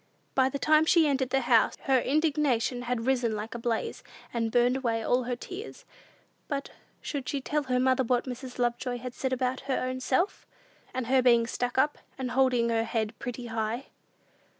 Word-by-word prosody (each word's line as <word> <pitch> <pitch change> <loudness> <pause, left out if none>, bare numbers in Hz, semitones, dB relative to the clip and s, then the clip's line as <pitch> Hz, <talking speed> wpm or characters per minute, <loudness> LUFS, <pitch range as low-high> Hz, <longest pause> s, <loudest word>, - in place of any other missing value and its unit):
By 260 -1 +3
the 280 - -3
time 310 +2 +4
she 330 -2 +5
entered 265 -3 +1
the 270 +1 +2
house, 240 -2 +3
her 265 -1 +3
indignation 280 -4 +1
had 245 -2 -2
risen 245 -4 +1
like 215 +2 -5
a 235 - -5
blaze, 230 -1 -2 0.3
and 230 -2 -1
burned 245 +2 +3
away 230 -4 -1
all 245 +2 +1
her 245 0 -1
tears. 380 - -9 0.6
But 280 -2 -3 0.3
should 275 -4 -4
she 285 - -1
tell 295 +3 -1
her 250 -1 +1
mother 260 +1 +3
what 245 0 +1
Mrs. 255 0 -7
Lovejoy 245 0 -1
had 250 0 -7
said 265 +1 -2
about 255 0 0
her 265 - +2
ownself, 255 +7 -1 0.4
about 255 -1 -3
her 260 +2 +3
being 235 -2 +5
"stuck 245 +1 -3
up," 295 +3 +2 0.2
and 255 -2 -3
holding 250 -3 +3
her 225 -1 +2
head 225 -1 -2
pretty 245 0 -5
high? 225 +2 -3
250 Hz, 185 wpm, -28 LUFS, 240-265 Hz, 0.6 s, she